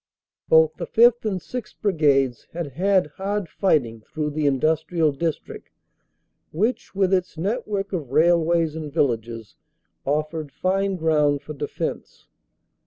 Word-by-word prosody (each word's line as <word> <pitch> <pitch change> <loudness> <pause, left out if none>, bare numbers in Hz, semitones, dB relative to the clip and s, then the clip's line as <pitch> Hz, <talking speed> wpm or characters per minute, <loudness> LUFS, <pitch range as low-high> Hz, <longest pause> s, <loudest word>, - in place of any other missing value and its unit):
Both 160 -1 +5
the - - -5
5th. 235 0 +4
and 195 -4 -1
6th. 240 +2 -7
Brigades 140 - +1
had 170 -3 -4
had 190 +6 +2 0.2
hard 200 -1 -1
fighting 135 - 0
through 150 +6 -4
the 150 0 0
industrial 155 +3 +1
district 160 +3 -4 0.8
which 215 +6 -1
with 195 -1 +2
its 180 -3 0
net 210 +9 -2
work 200 -1 -3
of 155 -8 -3
railways 165 +1 +3
and 155 -2 -6
villages 115 -7 -1 0.5
offered 150 +1 -2
fine 195 +3 0
ground 150 -4 +1
for 155 - -7
defense. 140 - -5
160 Hz, 130 wpm, -23 LUFS, 145-190 Hz, 0.8 s, Both